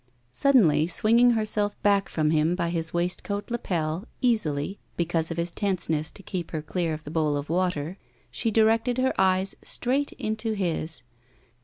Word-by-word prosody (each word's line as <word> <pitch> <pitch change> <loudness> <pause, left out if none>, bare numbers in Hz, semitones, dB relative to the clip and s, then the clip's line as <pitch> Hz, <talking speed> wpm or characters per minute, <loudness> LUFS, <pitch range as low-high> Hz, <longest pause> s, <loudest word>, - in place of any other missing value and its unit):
Suddenly, 165 - +4
swinging 230 +7 +4
herself 210 -1 0
back 200 -1 +3
from 155 -1 +1
him 160 +2 +2
by 170 -2 -1
his 165 -1 -2
waistcoat 180 +5 -2
lapel, 175 -4 -2
easily, 195 - 0 0.2
because 165 -1 0
of 165 - -4
his 170 +1 -1
tenseness 170 -6 -1
to 200 - -12
keep 180 -3 -4
her 155 -2 -4
clear 165 0 -1
of 155 - -11
the 150 - -8
bowl 155 -3 +1
of 145 +2 -5
water, 180 -1 -1 0.3
she 230 - -1
directed 225 +3 +2
her 260 +1 +2
eyes 190 0 +2
straight 275 +4 -1
into 220 +1 -3
his. 165 -7 -3
180 Hz, 160 wpm, -26 LUFS, 160-215 Hz, 0.3 s, Suddenly